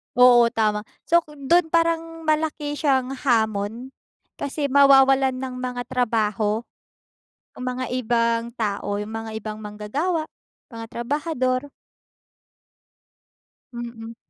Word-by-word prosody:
Oo, 245 -1 +7
tama. 215 -2 +1 0.2
So 340 - +4
ku 305 -3 -14
do'n 320 +5 +2
parang 330 0 0
malaki 310 -1 0
siyang 270 -3 +1
hamon, 225 0 0 0.5
kasi 285 0 -2
mawawalan 270 -1 +5
ng 255 0 -5
mga 250 -1 -3
trabaho, 220 -3 0 0.9
yung - - -8
mga 255 0 -4
ibang 230 -1 0
tao, 205 -3 -2
yung 210 +1 -6
mga 225 0 -5
ibang 215 0 -7
manggagawa, 280 - -2 0.4
mga 230 -3 -8
trabahador. 260 +1 -1 2.0
Mm. 235 -1 -7
250 Hz, 105 wpm, -23 LUFS, 225-285 Hz, 2.0 s, Oo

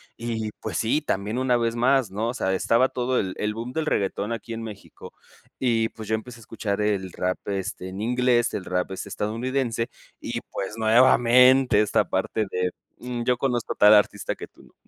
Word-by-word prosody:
Y, 115 -2 -3
pues, - - -3
sí, 120 +7 +1
también 105 -3 -2
una 125 -2 +2
vez 115 0 0
más, 125 -1 +2
¿no?, 110 +4 -2
o 120 - -2
sea 95 -7 -1
estaba 115 +7 +3
todo 125 0 -1
el 95 -2 -2
el 105 0 -1
boom 115 +3 -6
del 160 -1 -1
reguetón 100 -3 -1
aquí 115 0 -5
en 115 0 -5
México 105 -3 -10 0.5
y 115 -3 +1
pues 110 -2 -10
yo 110 - +1
empecé 120 +2 -8
a - - -15
escuchar 105 -2 -3
el 100 -3 0
rap, 90 0 -2
este, 95 -1 -4
en 95 +2 -7
inglés 120 +1 +2
el 95 - -3
rap 90 +1 -2
es 95 +1 -5
estadounidense 115 +3 -2 0.3
y, - - -3
pues, 100 +3 -5
nuevamente, 120 +1 +5
esta 105 - +2
parte 110 -1 -1
de, 90 0 -1 0.3
mm, 120 -1 -4
yo 125 -1 +2
conozco 125 -3 -1
tal 105 +1 +7
artista 105 -1 +2
que - - -9
tú - - -21
no. - - -21
115 Hz, 200 wpm, -24 LUFS, 105-125 Hz, 0.5 s, tal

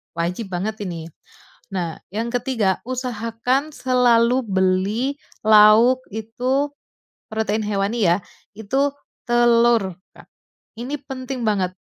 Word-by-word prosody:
wajib 175 +6 -2
banget 215 +5 -3
ini. 165 -3 -6 0.6
Nah, 170 -4 -3
yang 225 +3 -2
ketiga 235 -6 0
usahakan 250 +3 -2
selalu 250 -1 +3
beli 190 +4 +1 0.4
lauk 215 +4 +6
itu, 250 +6 -1 0.6
protein 220 0 -1
hewani 205 0 0
ya, 175 - +4 0.4
itu 265 +7 0 0.4
telur 235 -4 +3 0.2
Kak. - - -16 0.5
Ini 265 +5 -4
penting 260 -2 -5
banget. 190 -4 +1
225 Hz, 100 wpm, -21 LUFS, 200-250 Hz, 0.6 s, lauk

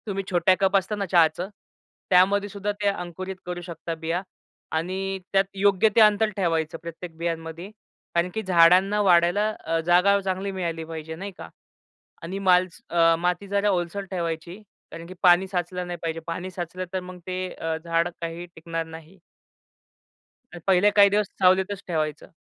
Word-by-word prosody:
तुम्ही 195 -1 -2
छोट्या 180 +1 +3
कप 195 0 +3
असत 190 +2 -2
ना, 200 - -1
चहाचं, 170 0 +2 0.6
त्यामध्येसुद्धा 200 +2 +2
ते 205 - +1
अंकुरित 185 0 -3
करू 175 0 -5
शकता 170 -1 -6
बिया 165 +2 -2 0.6
आणि 190 +3 -3
त्यात 195 0 +5
योग्य 200 +2 +3
ते 230 - +6
अंतर 215 0 +5
ठेवायचं 165 -4 0
प्रत्येक 170 0 -8
बियांमध्ये 165 +2 -4 0.5
कारण 170 +1 +2
की 220 - -2
झाडांना 185 +3 +5
वाढायला 180 +2 +4 0.2
अ, 165 0 0
जागा 180 +3 +4
चांगली 190 +1 -2
मिळाली 170 -4 -3
पाहिजे 160 0 -7
नाही 195 +4 -6
का - - -9 0.7
आणि 185 +4 -4
माल 185 -1 +4 0.2
अ, 165 -1 +4
माती 180 +3 -1
जरा 200 +1 +1
ओलसर 185 +1 -1
ठेवायची 170 +1 -4 0.3
कारण 165 0 -8
की 185 - -9
पाणी 180 +1 +6
साचलं 180 -1 -3
नाही 175 0 -5
पाहिजे. 165 -1 -3
पाणी 175 +3 -4
साचलं 180 +1 -5
तर 190 - 0
मग 180 0 -9
अ, - - -15
ते 185 0 -4 0.3
झाड 170 +1 +1
काही 165 +1 -5
टिकणार 165 0 -4
नाही. 160 +3 -12 1.5
पहिले 195 +2 +5
काही 200 -1 +7
दिवस 205 0 +1
सावलीतच 190 +1 +3
ठेवायचं. 155 -3 -3
180 Hz, 160 wpm, -25 LUFS, 170-195 Hz, 1.5 s, काही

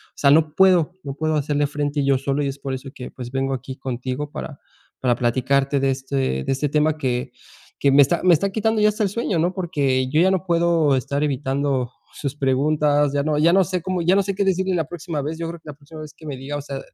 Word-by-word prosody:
sea 140 - +3
no 155 0 +3
puedo, 180 -3 +4
no 140 - -5
puedo 155 +2 -1
hacerle 145 0 0
frente 145 0 -2
yo 135 -1 +3
solo 140 +2 -1
y 140 - 0
es 135 +1 -4
por 135 -1 -5
eso 130 +1 -6
que 125 - -8
pues 125 -2 -8
vengo 135 +1 -1
aquí 130 0 -6
contigo 130 +2 -4
para 145 -2 -7 0.4
para 125 -2 +2
platicarte 135 +3 +1
de 135 0 +2
este 135 +1 -5 0.3
de - - -1
este 140 +2 -1
tema 155 +1 +1
que 125 -4 -2 0.5
que 140 - +3
me 140 +1 +7
está 170 +5 +2
me 180 -2 +6
está 195 +5 +2
quitando 220 +2 0
ya 210 - +5
hasta 210 +1 0
el 200 - +1
sueño, 205 -4 -1
¿no? 175 +3 +1
Porque 140 -8 0
yo 155 +4 +3
ya 190 - +4
no 190 -1 -1
puedo 170 -4 +2
estar 140 +3 -2
evitando 135 -2 -1 0.2
sus 140 -1 -4
preguntas, 145 +1 +2
ya 140 0 +1
no 150 -1 0
ya 160 +3 +4
no 190 +1 +4
sé 180 0 -2
cómo 185 +1 -2
ya 175 +3 +3
no 200 - +3
sé 195 0 -3
qué 200 0 0
decirle 190 0 +1
la 165 -4 -1
próxima 165 -3 -4
vez, 155 +3 -4
yo 165 0 -4
creo 170 -1 -7
que 160 - -22
la - - -6
próxima 150 +2 -13
vez 155 -1 -9
que 155 - -15
me 140 -4 -5
diga, 135 +3 -6
o 145 - -3
sea, 140 -1 -6
145 Hz, 255 wpm, -22 LUFS, 135-170 Hz, 0.5 s, me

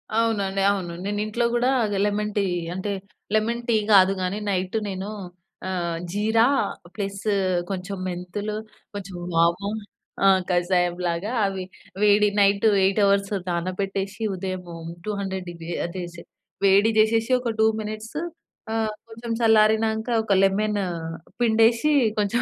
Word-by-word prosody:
అవునండి, 200 -4 +1
అవును. 185 -4 -3
నేను 205 0 -2
ఇంట్లో 235 +3 0
గూడా 240 +2 +2 0.4
లెమన్ 210 +1 -1
టీ 200 - +3 0.3
అంటే 190 +2 -3 0.4
లెమన్ 230 +2 +1
టీ 230 - +4 0.2
కాదు 190 0 +7
గానీ 185 +3 -1
నైటు 185 +2 -1
నేను 190 0 -4 0.6
ఆహ్, 170 -3 -2 0.2
జీరా, 220 +3 +3 0.5
ప్లస్ 200 -1 -4 0.5
కొంచెం 195 0 -4
మెంతులు, 185 +4 -4 0.4
కొంచెం 195 -2 -7 0.2
వాము 170 +4 +2 0.6
ఆహ్, 190 -1 +6
కషాయంలాగా 175 +2 0
అవి 195 -1 -2 0.4
వేడి 210 0 +5
నైట్ 200 +2 +4 0.2
8 195 +2 +2
అవర్స్ 200 0 +2 0.2
నానబెట్టేసి, 195 +3 -3
ఉదయము 185 -2 -5 0.3
200 190 -3 -3
డిగ్రీ 170 0 -7
అదేసి 175 -1 -6 0.4
వేడి 200 +3 +5
జేసేసి 225 +3 +3
ఒక 245 -2 -2
2 220 +2 -1 0.6
ఆహ్, 220 -1 0 0.2
కొంచెం 230 +1 -7
చల్లారినాంక 220 0 +3 0.2
ఒక 205 - +1
లెమను 205 0 +1 0.6
పిండేసి 230 +5 +4 0.3
కొంచెం 210 +4 +1
200 Hz, 120 wpm, -24 LUFS, 185-220 Hz, 0.6 s, కాదు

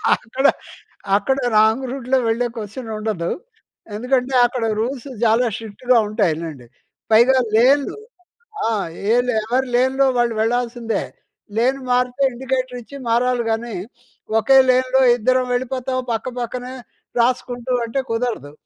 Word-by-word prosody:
అక్కడ, 260 +5 -4 0.7
అక్కడ 265 +6 0 0.2
రాంగ్ 220 +5 +3
రూట్‌లో 265 0 0
వెళ్ళే 235 +2 +1
కొశ్చన్ 225 +3 -7
ఉండదు. 210 -6 -2 0.6
ఎందుకంటే, 250 +3 0
అక్కడ 240 -1 -2 0.2
రూల్స్ 250 +3 -3 0.2
చాలా 230 +2 +3
స్ట్రిక్ట్‌గా 225 +3 0
ఉంటాయి 205 -7 +1
లెండి. 140 -7 -8 0.4
పైగా 240 +4 +6 0.2
లేన్లు 275 - +3 0.7
ఆ! - - +1 0.4
ఏలే 245 0 +2
ఎవరి 255 +3 0
లేన్‌లో 260 +2 +3
వాళ్ళు 240 -1 +2
వెళ్లాల్సిందే. 235 0 -1 0.5
లేను 260 +4 +2
మారితే 250 +2 +1
ఇండికేటర్ 255 0 -3
ఇచ్చి 280 +5 -13
మారాలి 245 +1 +2
గానీ, 225 0 -3 0.6
వకే 245 +5 +5
లేన్‌లో 255 +1 +2 0.2
ఇద్దరం 255 +2 +2
వెళ్ళిపోతాం 255 +1 -2
పక్క 225 +3 -2
పక్కనే 250 +2 -5 0.5
రాసుకుంటూ 245 0 0
అంటే 230 +4 -2
కుదరదు. 225 - -2
245 Hz, 120 wpm, -20 LUFS, 225-255 Hz, 0.7 s, పైగా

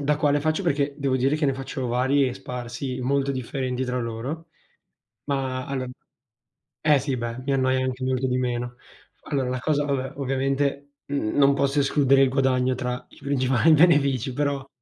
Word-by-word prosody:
da 145 +1 +2
quale 145 -1 +2
faccio, 155 +4 0
perché 145 -4 0
devo 135 -2 0
dire 135 +4 +2
che 155 - -1
ne 135 - +3
faccio 135 0 -4
vari 130 +3 +2
e 125 - -2
sparsi, 125 +1 -5
molto 140 +2 0
differenti 130 0 -3
tra 125 0 -2
loro. 125 +8 -5 0.8
Ma 130 -2 -2
allora 130 -2 -3 0.9
eh, 150 -2 +4
sì, 135 0 -2
beh, 120 0 -4
mi 140 - +1
annoia 130 -1 +2
anche 130 0 -3
molto 130 0 0
di 125 -1 0
meno. 120 -1 -2 0.6
Allora, 135 -4 0
la 130 -1 -2
cosa 145 0 +1
vabbè, 135 -1 -2
ovviamente, 135 +1 -1
mhmm, 140 -6 -2
non 140 -1 +5
posso 140 +1 +1
escludere 135 -1 +4
il 135 - +5
guadagno 130 -1 +2
tra 125 0 -4
i - - -18
principali 135 +2 +2
benefici, 145 -5 +4
però 140 0 -2
135 Hz, 175 wpm, -24 LUFS, 130-140 Hz, 0.9 s, non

